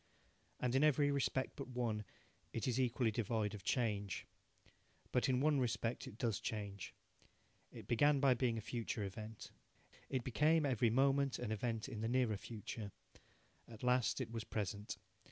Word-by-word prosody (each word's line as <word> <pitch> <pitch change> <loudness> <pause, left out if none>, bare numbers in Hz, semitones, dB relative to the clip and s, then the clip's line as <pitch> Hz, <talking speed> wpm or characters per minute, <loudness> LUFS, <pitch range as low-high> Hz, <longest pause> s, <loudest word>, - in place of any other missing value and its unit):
And 125 -1 0
in 135 +2 +4
every 145 -1 +4
respect 135 -1 0
but 140 - -5
one 120 -4 -2 0.5
it 115 0 -1
is 125 0 +1
equally 125 -2 +2
devoid 110 -1 0
of 105 -2 -7
change. 105 -5 0 0.9
But 125 +1 +2
in 130 0 +3
one 150 -1 +4
respect 120 0 -1
it 115 -5 -9
does 115 -5 0
change. 100 -3 -4 0.8
It - - -9
began 145 +4 +4
by 135 -2 +5
being 120 -2 +1
a - - -2
future 115 -1 -3
event. 105 +2 -7 0.6
It 130 -3 -1
became 150 +6 +3
every 125 -4 +3
moment 135 +2 +3
an 105 - -3
event 110 +1 -1
in 115 -5 -5
the 115 - 0
nearer 120 -4 +2
future. 105 0 -6 0.8
At 115 0 -11
last 125 0 +3
it 120 -4 -3
was 115 -1 -3
present. 105 -1 -3
120 Hz, 160 wpm, -38 LUFS, 110-130 Hz, 0.9 s, by